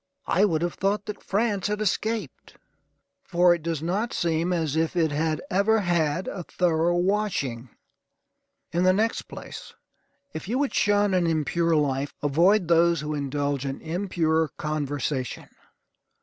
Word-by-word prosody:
I 195 - +3
would 165 -5 0
have 175 - -1
thought 200 +1 -1
that 210 -1 -6
France 205 -1 0
had 210 0 -2
escaped, 215 +2 -2 0.7
for 180 -7 +4
it 170 - -3
does 160 -1 -3
not 200 +8 -1
seem 170 +1 0
as 160 -4 -1
if 160 +2 0
it 160 -3 +2
had 155 +1 -1
ever 210 +3 +3
had 170 -2 0
a 190 - -4
thorough 175 0 +1
washing. 175 - -1 1.0
In 170 +2 0
the 185 0 +5
next 220 +4 0
place, - - -10 0.6
if 160 - -6
you 235 +5 0
would 280 0 0
shun 205 -1 +2
an 180 -2 +2
impure 165 +1 +1
life, 140 -2 0
avoid 175 +7 +3
those 170 0 +4
who 150 0 -3
indulge 145 -1 -2
in 135 -1 -4
impure 160 -2 0
conversation. 145 -4 -3
170 Hz, 150 wpm, -25 LUFS, 155-195 Hz, 1.0 s, the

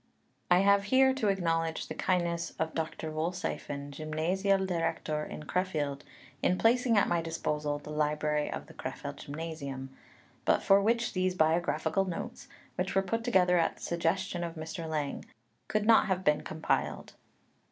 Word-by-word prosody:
I 180 +1 +6
have 200 0 +4
here 265 +4 +5
to 260 -5 -1
acknowledge 165 -4 0
the - - -5
kindness 170 -2 0
of 160 0 -2
Dr. 160 -1 -3
Wollseiffen, 155 -3 -3
Gymnasialdirektor 165 0 0
in - - -7
Crefeld, 150 -5 -1 0.4
in 180 - +2
placing 235 +1 +3
at 200 - +4
my 170 -1 +1
disposal 150 -3 -2
the 150 +1 -9
library 150 0 0
of - - -5
the - - -14
Crefeld - - -6
Gymnasium, 140 -3 -6 0.5
but - - +2
for 195 0 +6
which 230 +3 +1
these 185 0 0
biographical 165 +2 +2
notes, 235 +7 -6 0.3
which 185 +2 -1
were 195 - +4
put 230 +3 -2
together 180 -6 +4
at - - +1
the - - -14
suggestion 175 +2 -1
of 170 -1 -4
Mr. 160 +1 -5
Lang, 150 -3 -2 0.4
could 215 -1 0
not 225 0 +6
have 190 -1 0
been 150 -2 +3
compiled. 160 0 -2
170 Hz, 150 wpm, -30 LUFS, 155-195 Hz, 0.5 s, I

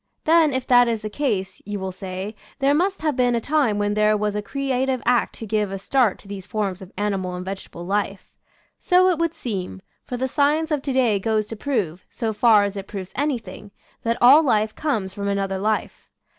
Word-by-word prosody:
Then, 320 -1 +4
if 260 -1 -2
that 245 -1 +5
is 225 -2 -1
the 215 - -4
case, 195 -8 -2
you 205 0 -5
will 190 0 -4
say, 190 +2 -6 0.2
there 275 0 +3
must 370 +3 0
have 305 -3 +1
been 245 -1 +2
a - - +1
time 275 -4 +1
when 205 0 0
there 215 0 +3
was 210 0 -1
a 210 - -1
crea 265 +2 -1
tive 260 -2 -1
act 245 0 +2
to 225 - -7
give 210 -2 0
a 195 - -3
start 230 +1 +1
to - - -16
these 195 -2 -7
forms 200 -4 -2
of 190 0 -11
ani 205 0 0
mal 185 -1 -4
and 180 0 -6
vegetable 190 -3 -7
life. 200 0 -2 0.5
So 370 0 +4
it 335 - -1
would 335 -1 0
seem, 185 - -4 0.3
for 250 - -3
the 260 +2 -1
science 300 +4 +1
of 295 -2 +1
to 275 - -3
day 240 -6 +2
goes 215 +1 0
to 225 - -7
prove, 205 - -2
so 225 -3 -3
far 215 -1 +5
as 200 0 -2
it 195 -1 -6
proves 190 -3 -7
anything, 235 -8 -3 0.3
that 230 0 0
all 265 +6 +8
life 215 -7 +1
comes 215 -11 -2
from 200 0 -4
another 195 -1 -1
life. 215 +2 -2
215 Hz, 225 wpm, -23 LUFS, 200-265 Hz, 0.5 s, all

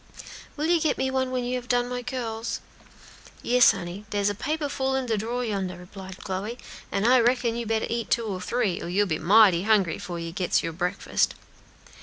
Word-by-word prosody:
"Will 300 - -1
you 335 0 +3
get 305 -2 +1
me 265 0 0
one 260 -1 0
when 255 -1 -1
you 245 - -2
have 250 0 -8
done 245 0 +2
my 250 0 -3
curls?" 235 -2 -4 0.8
"Yes, 250 0 +6
honey, 190 0 -6
dere's 205 -1 +1
a - - -3
paper 295 +8 -2
full 265 -1 -1
in 265 -1 -1
de 230 -2 0
drawer 235 +4 -2
yonder," 190 -5 -3
replied 190 +1 -10
Chloe, 200 +5 -4 0.3
"an' 200 +1 0
I 255 +2 +6
reckon 240 -1 +2
you 235 -1 -3
better 220 0 0
eat 235 -1 -3
two 235 - +1
or 190 -4 -4
three, 210 -1 -1
or - - -5
you'll 200 +3 +2
be 160 -5 -2
mighty 190 0 +6
hungry 200 -5 +2
'fore 175 -1 -5
you 165 0 -5
gits 180 +1 0
your 165 - -3
breakfast." 180 +3 0
225 Hz, 210 wpm, -26 LUFS, 190-250 Hz, 0.8 s, Yes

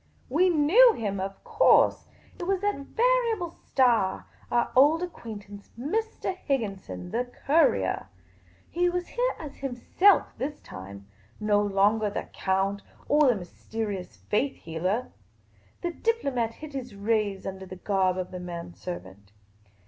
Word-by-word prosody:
We 345 +8 +4
knew 360 +10 +6
him, 200 -3 -2
of 195 +1 -5
course; - - +4 0.3
it 350 - -3
was 385 -1 +1
that 410 0 +1
variable 455 - +1
star, 235 - +1 0.2
our 240 - +1
old 300 +6 +5
acquaintance, 205 - -8
Mr. 380 - -2
Higginson, 205 - -3
the 240 +2 0 0.2
courier. 275 - +3 0.6
He 355 +1 +2
was 355 0 -3
here - - 0
as 295 -3 -9
himself 275 +9 +2
this 290 +2 -3
time; 100 +2 -10 0.3
no 210 -1 +3
longer 205 +2 +2
the 205 - -3
count 195 +1 0 0.3
or 295 0 +5
the 245 - +4
mysterious 200 +1 -5
faith 265 +7 -1
healer. 185 +9 -2 0.7
The 345 - -1
diplomat 275 - -1
hid 310 -2 -10
his 255 -5 -6
rays 205 -1 0
under 190 0 -6
the 185 - -8
garb 185 -1 +1
of 185 -1 -4
the 180 - -6
man 175 -1 -7
servant. 100 - -8
230 Hz, 135 wpm, -27 LUFS, 195-320 Hz, 0.7 s, knew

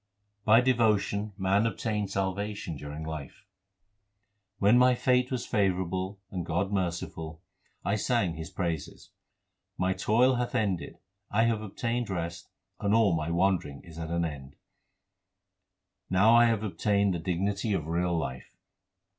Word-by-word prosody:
By 110 +2 +7
devotion 110 -4 +1
man 100 +3 +2
obtains 105 -3 -2
salvation 100 -1 -2
during 75 +2 -7
life: 80 -4 -7 1.1
When 105 +3 +5
my 125 0 +5
fate 125 0 +2
was 130 -2 -2
favourable 95 -2 -1
and 90 -2 -3
God 90 +4 -1
was - - -3
merciful, 85 -3 -3 0.4
I 100 - +1
sang 100 -6 +1
His 80 +1 -7
praises. 85 -6 -4 0.7
My 90 +1 +1
toil 125 +6 +3
hath 125 0 -2
ended, 100 -6 -1 0.3
I 110 +2 +2
have 115 -2 +1
obtained 115 +3 -2
rest, 85 -2 -4 0.3
and 100 +1 +2
all 105 -6 +4
my 80 0 -2
wandering 85 -5 0
is 85 -1 -11
at 80 -1 -5
an 85 0 0
end. 70 -3 -7 1.5
Now 100 +5 +5
I 120 0 +7
have 115 -2 +1
obtained 100 +1 +1
the 85 - -2
dignity 95 +5 -1
of 80 -6 -1
real 85 +1 0
life. 65 -5 -5
95 Hz, 140 wpm, -29 LUFS, 85-110 Hz, 1.5 s, By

